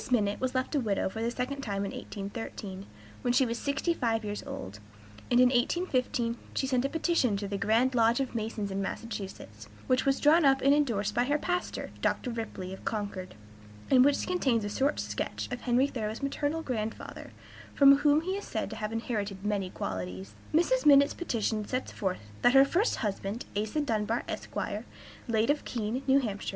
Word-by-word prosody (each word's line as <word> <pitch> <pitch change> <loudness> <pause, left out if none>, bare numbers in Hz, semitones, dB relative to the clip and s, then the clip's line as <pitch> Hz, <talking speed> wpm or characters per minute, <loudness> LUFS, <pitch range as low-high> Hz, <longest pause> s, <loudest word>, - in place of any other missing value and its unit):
Minott 210 -5 +1
was 260 0 -1
left 255 +3 -1
a 290 - +2
widow 205 -6 0
for 220 +3 -6
the 230 - +1
second 255 +3 -3
time 200 -5 -2
in - - -4
1813, 200 -1 -6 0.3
when 245 - +1
she 255 +1 +4
was 230 -1 -3
sixty 280 +4 0
five 225 -7 0
years 205 0 -3
old, 100 +3 -7 0.5
and 245 - +4
in 250 0 +7
1815 250 -3 0 0.2
she - - +1
sent 255 -2 +1
a 275 - 0
petition 320 - +1
to 200 0 -4
the 200 - -3
Grand 230 +5 +3
Lodge 230 0 +3
of 270 -2 -2
Masons 215 -3 -3
in 195 +1 -2
Massachusetts, 205 -1 -6 0.2
which 255 -1 +2
was 275 0 +2
drawn 315 +3 +5
up 270 -1 +5
and 275 +1 +5
indorsed 225 -9 +1
by 240 +2 +2
her 290 +3 +2
pastor, 355 +3 -3
Dr. 250 - 0
Ripley, 205 -5 -5
of 190 - -10
Concord, 200 - -4 0.6
and 255 -1 +7
which 285 +1 +3
contains 260 -12 +1
a - - -2
short 275 +7 0
sketch - - -3
of 245 - -4
Henry 250 +2 +3
Thoreau's 220 -3 -4
maternal 290 +3 -1
grandfather, 225 -5 -4 0.5
from 275 -1 +8
whom 290 +1 +4
he 365 +3 -3
is 405 - -5
said - - -3
to - - -6
have 215 -1 -3
inherited 210 -4 -3
many 200 -3 0
qualities. 95 - -5 0.2
Mrs. 425 +11 +3
Minott's 280 -1 +6
petition 225 - -1
sets 255 +5 -3
forth 185 - -2 0.2
"that 245 +2 +5
her 270 0 +9
first 370 - +1
husband, 200 +2 -3
Asa 215 +9 0
Dunbar, 225 -3 0
Esq., - - -6 0.7
late 230 +2 +2
of 295 - -1
Keene, 230 +2 -2
N. 265 -2 +4
H. 200 -1 -4
240 Hz, 190 wpm, -29 LUFS, 210-275 Hz, 0.7 s, her